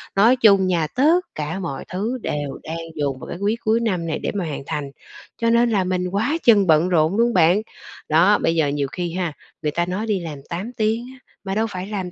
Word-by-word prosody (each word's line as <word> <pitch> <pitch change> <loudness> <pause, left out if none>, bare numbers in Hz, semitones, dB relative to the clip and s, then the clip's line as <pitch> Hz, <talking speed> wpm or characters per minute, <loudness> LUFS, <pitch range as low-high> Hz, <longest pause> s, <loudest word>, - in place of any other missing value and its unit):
Nói 220 +6 +5
chung 200 -6 +5
nha, 170 -4 +1
tất 310 +8 +4 0.2
cả 155 +5 -3
mọi 165 -7 -5
thứ 215 +8 -3
đều 145 -2 -4
đang 160 +1 -5 0.2
dồn 140 -3 -2
vào - - -9
cái - - -5
quý 205 +3 +1
cuối 220 +1 +2
năm 185 -8 -1
này 160 - -2
để - - -2
mà 195 -3 -1
hoàn 150 -3 -5
thành, 140 -2 -4 0.5
cho 230 -1 +1
nên 235 +1 +4
là 200 -4 +2
mình 180 0 -1
quá 225 - 0
chừng 205 -5 +5
bận 160 +2 +4
rộn 165 +2 +2
luôn 235 +1 +3
bạn. 180 +3 +4 0.5
Đó, 175 +7 +5
bây 165 - +1
giờ 160 -3 +2
nhiều 140 -1 -1
khi 175 0 -4
ha, 175 -4 -2 0.3
người 150 - -1
ta 170 +3 0
nói 185 +5 -3
đi 205 -4 +1
làm 155 -4 -7
8 185 +7 -4
tiếng 225 +2 0
á, 260 - -17 0.2
mà 195 -1 -3
đâu 220 +1 +1
phải 185 -1 -6
làm 190 -4 -4
185 Hz, 240 wpm, -21 LUFS, 165-220 Hz, 0.5 s, Nói